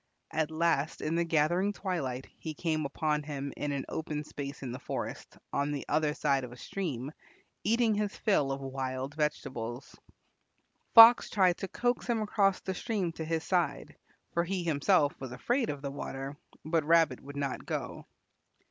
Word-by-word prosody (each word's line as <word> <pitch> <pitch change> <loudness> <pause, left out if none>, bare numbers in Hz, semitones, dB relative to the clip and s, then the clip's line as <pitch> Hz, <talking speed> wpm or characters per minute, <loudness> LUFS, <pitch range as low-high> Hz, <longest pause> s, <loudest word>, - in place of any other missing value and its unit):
At 155 -1 0
last 160 -2 0
in 155 - -1
the 170 +1 +2
gathering 170 +5 +2
twilight 140 -11 -3
he 155 -2 -5
came 155 -2 -1
upon 150 +1 0
him 140 -2 -5
in 145 - -2
an 140 -2 -2
open 150 -1 -3
space 140 -2 -7
in 125 - -4
the 125 - -6
forest, - - -5 0.2
on 140 +1 0
the 145 -2 -3
other 150 0 +1
side 140 -3 +1
of 125 - -7
a 120 - -11
stream, 145 -6 -4 0.5
eating 230 0 +3
his 210 -1 -1
fill 150 -10 +2
of 135 0 -3
wild 135 0 -4
vegetables. 135 -5 -3 1.0
Fox 230 +1 +10
tried 185 -3 +3
to 195 - -4
coax 245 +5 -1
him 235 -2 +1
across 205 -2 +2
the 190 - -3
stream 200 -4 -2
to 160 - -6
his 160 +1 -1
side, 180 -3 -1 0.4
for 170 - +2
he 185 +1 -2
himself 155 0 +3
was 130 -2 -5
afraid 240 - 0
of 145 -1 -4
the 140 - -3
water, 135 0 -5 0.3
but 160 0 +1
Rabbit 160 -4 +4
would 140 +1 -9
not 140 -2 -3
go. - - -4
155 Hz, 175 wpm, -31 LUFS, 140-180 Hz, 1.0 s, Fox